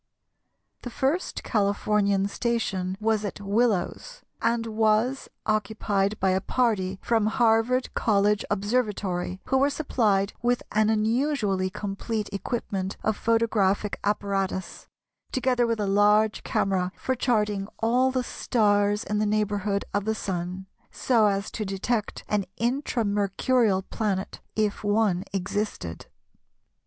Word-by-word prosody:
The 245 - -6
first 275 +9 -1
Californian 200 -2 +1
station 200 -5 -1
was 220 -1 +1
at 205 - -4
Willows, 220 - -1 0.2
and 230 0 +1
was 220 +4 +1 0.2
occupied 210 -1 0
by 190 0 +2
a 190 +1 +1
party 200 -5 0
from 225 -3 +2
Harvard 230 +2 +2
College 210 -2 +2
Observatory, 205 -4 -1
who 265 - +2
were 280 +1 +4
supplied 215 -9 +1
with 245 +1 +1
an 215 +1 +3
unusually 220 -3 +1
complete 205 +2 -4
equipment 195 -3 -3
of 220 - +1
photographic 215 -3 +1
apparatus, 195 -2 -2 0.4
together 250 -2 +1
with 230 -1 -1
a 205 - 0
large 210 +2 +3
camera 185 -2 0
for 260 - -1
charting 210 -5 0
all 245 +3 +2
the 255 -1 -1
stars 205 -3 +1
in 210 0 -1
the 215 - +1
neighbourhood 205 -1 0
of 205 0 0
the 220 0 0
Sun, 185 -1 -4 0.2
so 230 -4 +2
as 200 0 -1
to 220 - -3
detect 205 +3 -2
an 205 -2 0
Intra 240 -1 0
Mercurial 205 +1 +1
planet 195 -2 -3
if 215 -1 0
one 205 -3 +1
existed. 195 - -3
210 Hz, 125 wpm, -26 LUFS, 195-230 Hz, 0.4 s, were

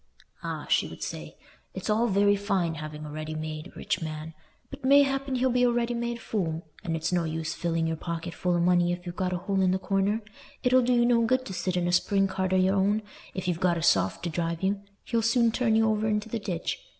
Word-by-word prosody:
"Ah," - - -4
she - - +2
would - - -8
say, - - -6 0.4
"it's - - -5
all 225 +2 +2
very 205 0 +4
fine 195 -4 0
having 155 0 -7
a 150 - -7
ready 155 +1 -5
made 155 +2 -5
rich 205 -2 -2
man, 155 0 -5 0.4
but 275 0 -9
mayhappen 275 0 +4
he'll 255 +1 +2
be 250 +1 +2
a 245 - +5
ready 240 0 0
made 235 0 -2
fool; 170 -8 -2 0.2
and 165 -2 -2
it's 160 - -2
no 175 -1 +2
use 160 0 -3
filling 165 -1 -1
your 160 0 0
pocket 170 +1 -5
full 180 -1 0
o' - - +1
money 175 0 +3
if 175 +1 -4
you've 175 0 -6
got 185 -1 -1
a 180 - 0
hole 195 +2 -1
in 185 - +3
the 185 - +2
corner. 195 +3 0 0.4
It'll 255 +1 +5
do 250 +1 +2
you 240 -1 +4
no 240 -1 +4
good 255 +3 +1
to 190 - -6
sit 185 0 -1
in 175 -1 +1
a - - +1
spring 195 +2 +3
cart 190 -1 -2
o' - - +3
your 185 +1 +3
own, 205 +3 +2 0.3
if 185 -1 -4
you've 175 -2 0
got 180 -2 +2
a 165 - -3
soft 95 - +2
to 170 - -2
drive 165 +1 -2
you: 195 +1 0 0.2
he'll 230 - 0
soon 230 +1 +3
turn 225 -2 +1
you 225 0 +4
over 215 0 +1
into 210 0 -1
the 230 - -2
ditch. 185 - -3
190 Hz, 245 wpm, -27 LUFS, 170-225 Hz, 0.4 s, a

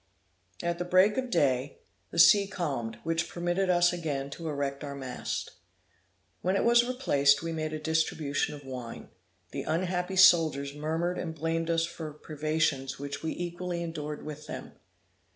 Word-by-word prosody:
At 170 +1 -2
break 185 +4 +5
of 255 -1 -1
day, 140 - +1 0.3
the - - -8
sea 200 +4 +7
calmed, 140 - -3
which 165 +1 -1
permitted 175 +2 -1
us 175 0 +4
again 145 -5 -3
to 165 +3 -6
erect 140 -1 -3
our 140 -1 -5
mast. 130 -2 -4 0.9
When 185 +2 +1
it - - +2
was 235 0 +6
replaced, 145 - +3
we 165 - -2
made 155 -1 -2
a 155 - -3
distribution 155 -2 0
of 145 -1 -12
wine. 125 -3 -7 0.4
The - - -3
unhappy 180 +2 -1
soldiers 160 -7 +5
murmured 160 +4 -2
and 160 -2 -4
blamed 165 +1 -1
us 165 0 +2
for 160 -2 -7
privations 150 -3 -1
which 140 0 -5
we 160 - -2
equally 175 0 -4
endured 150 -3 -5
with 150 0 -7
them. - - -7
160 Hz, 155 wpm, -29 LUFS, 145-175 Hz, 0.9 s, sea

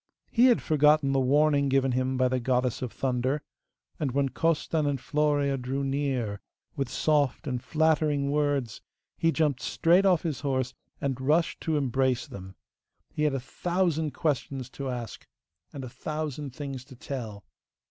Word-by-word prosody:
He 240 +1 +5
had 245 - +3
forgotten 150 -2 +4
the 135 - +2
warning 140 +1 +3
given 135 -1 +2
him 130 +1 0
by 130 0 +3
the 130 0 0
Goddess 125 0 0
of 125 -3 -3
Thunder, 130 +2 -1 0.6
and 140 -6 -1
when 140 0 +1
Costan 160 0 0
and 140 -1 0
Florea 145 -1 +1
drew 135 +3 -2
near 135 -7 -1 0.3
with 135 -3 -2
soft 145 -4 +1
and 125 -3 -2
flattering 150 -3 +2
words 145 -6 0 0.3
he 165 - +2
jumped 150 -5 +1
straight 180 +4 +3
off 180 -4 +3
his 160 -6 -2
horse, 130 -3 -1 0.3
and 135 -2 -2
rushed 155 +5 +1
to 160 -2 0
embrace 130 -2 +1
them. 95 0 -10 0.6
He 150 - 0
had 145 -2 +1
a - - -1
thousand 170 +3 -1
questions 135 -4 -2
to 140 -1 -5
ask, 120 -3 -6 0.4
and 140 -3 -7
a 130 - -6
thousand 150 0 -5
things 135 -3 -5
to 130 -1 -13
tell. 115 -6 -6
140 Hz, 160 wpm, -28 LUFS, 130-150 Hz, 0.6 s, He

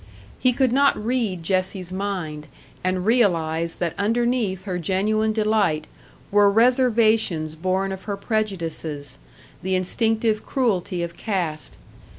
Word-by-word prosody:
He 255 - +4
could 255 0 +1
not 280 +2 +4
read 215 -6 -1
Jessie's 185 0 -1
mind, 180 -7 -4 0.4
and 185 0 -1
realise 170 -8 +2
that 170 -2 -2
underneath 225 -3 0
her 185 -3 -3
genuine 210 +5 +1
delight 210 -8 +1 0.5
were 205 0 +5
reservations 225 -8 +3
born 185 +4 -1
of 190 0 -7
her 200 -1 -3
prejudices, 165 - -3 0.4
the 190 0 0
instinctive 220 +3 +1
cruelty 190 -9 -1
of 170 0 -5
caste. 175 -7 -3
195 Hz, 120 wpm, -23 LUFS, 175-220 Hz, 0.5 s, were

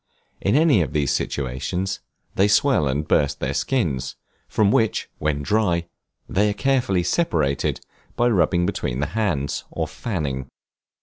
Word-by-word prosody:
In 100 - +2
any 150 - +5
of 80 - -2
these 75 -3 +1
situations, 70 +9 -2 0.3
they 100 - +3
swell 105 - +3
and 70 +3 -1
burst 70 -2 +2
their 65 - -2
skins, 70 - -1 0.3
from 105 -2 +2
which, 110 0 +1
when 75 -1 -1
dry, 90 -2 +1 0.4
they 105 +2 +2
are - - 0
carefully 125 -7 +1
separated 75 - 0 0.4
by 120 - +2
rubbing 90 -5 +2
between 65 -9 -2
the 75 - +1
hands, 85 -11 -1
or - - -3
fanning. 70 - -3
90 Hz, 140 wpm, -23 LUFS, 70-105 Hz, 0.4 s, any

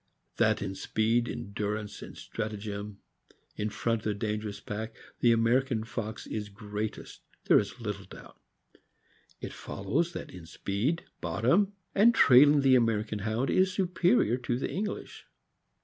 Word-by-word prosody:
That - - +2
in 95 -1 -3
speed, 115 +4 +1
endurance, 105 +1 -4
and - - -10
stratagem, 105 -2 -5 0.5
in 105 - -2
front 115 +1 -1
of - - -4
a 105 - +1
dangerous 105 -1 -3
pack, 110 +2 -5 0.2
the 120 - +5
American 115 +1 +2
fox 110 -1 -5
is 105 -1 -4
greatest, 105 +1 -6 0.2
there - - +6
is 100 +3 -5
little 105 -3 -5
doubt. - - -14 1.0
It - - -6
follows 155 - -2
that - - -6
in 90 -3 -11
speed, 105 - -1 0.2
bottom, 125 - +2 0.2
a/id 225 +4 +6
trailing 145 - +7
the 135 -1 +5
American 110 -3 +2
Hound 110 +6 -1
is 185 0 +3
superior 175 - +2
to 120 -1 -2
the 130 - -3
English. 205 +2 -4
110 Hz, 140 wpm, -29 LUFS, 105-130 Hz, 1.0 s, trailing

